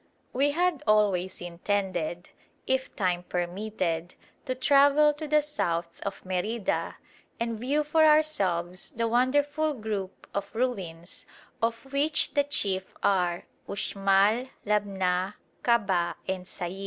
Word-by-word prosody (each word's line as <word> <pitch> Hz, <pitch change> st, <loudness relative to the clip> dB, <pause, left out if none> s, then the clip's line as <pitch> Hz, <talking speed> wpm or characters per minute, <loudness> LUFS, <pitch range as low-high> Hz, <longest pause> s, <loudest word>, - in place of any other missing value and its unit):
We 275 Hz, +3 st, +3 dB
had 345 Hz, 0 st, +1 dB
always 200 Hz, -4 st, +2 dB
intended, 175 Hz, -1 st, -2 dB, 0.3 s
if 260 Hz, 0 st, -1 dB
time 180 Hz, -3 st, 0 dB
permitted, 180 Hz, -1 st, -3 dB, 0.3 s
to 255 Hz, -, -2 dB
travel 285 Hz, +3 st, +5 dB
to 305 Hz, +1 st, -6 dB
the 300 Hz, 0 st, +3 dB
south 170 Hz, -, -2 dB
of 200 Hz, -1 st, -5 dB
Merida 190 Hz, +4 st, -1 dB, 0.4 s
and 230 Hz, -1 st, -2 dB
view 280 Hz, +6 st, +1 dB
for 315 Hz, +2 st, +3 dB
ourselves 195 Hz, -, +2 dB
the 230 Hz, 0 st, 0 dB
wonderful 290 Hz, +6 st, +2 dB
group 210 Hz, -5 st, -5 dB
of 200 Hz, +2 st, -4 dB
ruins 190 Hz, -9 st, -3 dB, 0.3 s
of 230 Hz, +4 st, -2 dB
which 300 Hz, +2 st, +1 dB
the 285 Hz, -, +3 dB
chief 195 Hz, -9 st, -2 dB
are 180 Hz, -3 st, +1 dB, 0.2 s
Uxmal, 200 Hz, +4 st, +2 dB, 0.2 s
Labna, 195 Hz, -2 st, 0 dB, 0.3 s
Kabah, 195 Hz, -8 st, +2 dB
and 185 Hz, -1 st, -2 dB
Sayil. 180 Hz, 0 st, -5 dB
210 Hz, 115 wpm, -28 LUFS, 185-270 Hz, 0.4 s, travel